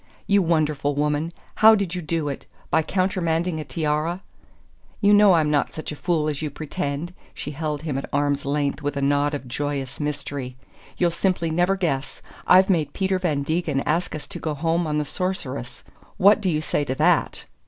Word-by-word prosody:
"You 200 0 +4
wonderful 155 -4 +1
woman 150 +2 0 0.3
how 220 0 +8
did 200 -5 -2
you 180 - -3
do 160 -1 -2
it? 140 - -5 0.2
By 160 - +4
countermanding 175 -2 0
a - - -3
tiara?" 155 +5 -2 0.8
"You 205 -1 +4
know 205 -2 +7
I'm 155 -3 +3
not 145 -2 +1
such 155 - -5
a - - -5
fool 160 -1 0
as 150 -1 -2
you 155 - -2
pretend!" 145 +3 -4 0.2
She 145 - -5
held 150 0 -3
him 145 -4 -2
at - - -7
arm's 145 0 0
length 145 +1 -1
with 145 0 -2
a - - -1
nod 145 +1 +2
of 135 -3 -7
joyous 140 0 -3
mystery. 140 -3 -4 0.4
"You'll 175 -1 +2
simply 170 -1 0
never 175 +4 +2
guess! 160 -8 -2 0.2
I've 185 +1 +7
made 165 -6 +1
Peter 190 -1 0
Van 155 -6 0
Degen 155 -2 0
ask 165 +4 -1
us 155 - -7
to 190 -3 -7
go 155 -2 -3
home 165 +3 0
on 150 0 -1
the 150 - 0
Sorceress. 135 -9 -4 0.3
What. 205 +3 +5
do 190 - +1
you 155 -2 0
say 150 - -1
to 130 -2 -3
that?" 160 +3 +2
155 Hz, 195 wpm, -23 LUFS, 145-175 Hz, 0.8 s, how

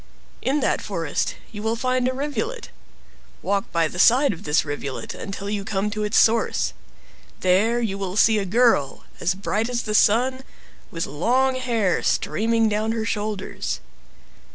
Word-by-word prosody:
In 280 +2 0
that - - +1
forest - - -2 0.2
you 210 -3 -7
will 220 +1 0
find 255 +1 0
a - - +1
rivulet. 300 - -4 0.7
Walk 200 0 -1
by 165 -1 +2
the 180 - -7
side 255 +5 +5
of 165 - -11
this 150 +1 +2
rivulet 140 -2 -5
until 195 0 -6
you 205 -1 -2
come 205 0 -2
to 215 0 -3
its 210 0 +1
source; 225 0 +3 0.7
there 205 +6 +3
you 200 -4 -2
will 195 0 -3
see 220 0 +5
a 200 - -2
girl, 215 - +2 0.2
as 180 - 0
bright 210 +4 -1
as 240 -1 -2
the 215 - -3
sun, 250 +5 +3 0.5
with 165 -1 -3
long 250 - +1
hair 235 -8 0
streaming 225 +1 +1
down 215 +1 0
her 225 -1 -2
shoulders. 210 -3 -3
215 Hz, 160 wpm, -23 LUFS, 195-240 Hz, 0.7 s, side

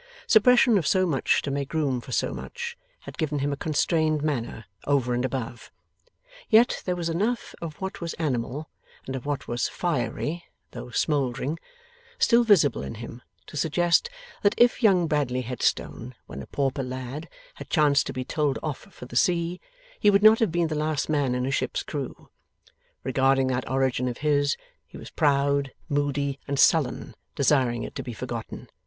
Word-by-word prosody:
Suppression 240 0 +5
of 160 - -2
so 185 -1 +3
much 150 -7 +1
to 140 - -3
make 140 +2 -3
room 135 -6 0
for 130 - -11
so - - 0
much, 475 -1 -6 0.3
had - - -11
given 150 -2 -1
him 140 +1 0
a - - -2
constrained 155 0 +1
manner, 120 -7 -3 0.2
over 135 -4 +2
and 120 +1 0
above. 125 -3 -4 0.8
Yet 230 +2 +4
there 180 - 0
was 170 -2 -3
enough 210 +9 -1
of 165 -3 -5
what 190 -1 -5
was 170 -1 -4
animal, 145 -1 -2 0.4
and 135 - -4
of 130 +1 -6
what 145 -2 -3
was 120 +1 -1
fiery 170 +1 -2 0.3
(though 120 0 -8
smouldering), 140 +2 -1 0.6
still 235 0 +4
visible 195 -11 +4
in - - -6
him, 115 +2 -9 0.2
to - - -12
suggest 170 - +2 0.3
that 205 - +3
if 240 +1 +4
young 190 -6 +4
Bradley 145 -5 0
Headstone, 125 0 -2
when 70 - -8
a - - -10
pauper 135 0 -1
lad, 130 +4 -6 0.2
had - - -11
chanced 145 -4 +3
to 135 - -4
be 130 0 -4
told 145 -1 0
off 150 -4 -3
for 200 - -13
the - - -11
sea, 175 -2 +1 0.4
he 210 - +5
would 200 0 +4
not 220 +1 +8
have 225 -7 +2
been 170 -1 +1
the - - -2
last 155 0 -1
man 140 -5 +1
in 125 0 -1
a 135 - -1
ship's - - -1
crew. - - -6 0.8
Regarding 135 0 +2
that 125 0 -2
origin 130 -1 +1
of 125 -1 -3
his, 145 -1 +2 0.3
he - - -12
was - - -10
proud, 140 -1 +2 0.2
moody, 140 -1 -1
and 140 0 -2
sullen, - - +3 0.2
desiring 130 -4 +2
it - - -7
to 140 - -4
be 125 -2 -6
forgotten. - - -6
145 Hz, 180 wpm, -26 LUFS, 130-170 Hz, 0.8 s, not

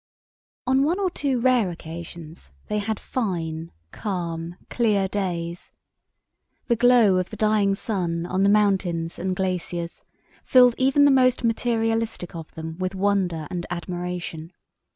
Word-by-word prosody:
On 265 +1 +3
one 335 +7 +1
or 380 -2 0
two 275 -6 0
rare 245 -5 +3
occasions 165 - -9 0.2
they 210 - 0
had 210 0 -2
fine, 165 -8 -3 0.2
calm, 170 -4 -4
clear 210 -5 +1
days. 175 -3 -4 0.9
The 235 - +2
glow 235 -5 +5
of 185 0 -1
the - - -8
dying 210 -2 +2
sun 175 -6 -2
on 185 +2 -1
the 200 - +4
mountains 190 -5 +1
and 185 +1 -1
glaciers 175 -2 -3 0.4
filled 250 -2 +6
even 270 +2 +4
the 285 - +6
most 255 -1 +3
materialistic 225 -4 0
of 165 -2 -8
them 160 +1 -7
with 185 +1 -2
wonder 185 -5 0
and 175 -1 -4
admiration. 175 -1 -5
190 Hz, 135 wpm, -24 LUFS, 170-225 Hz, 0.9 s, filled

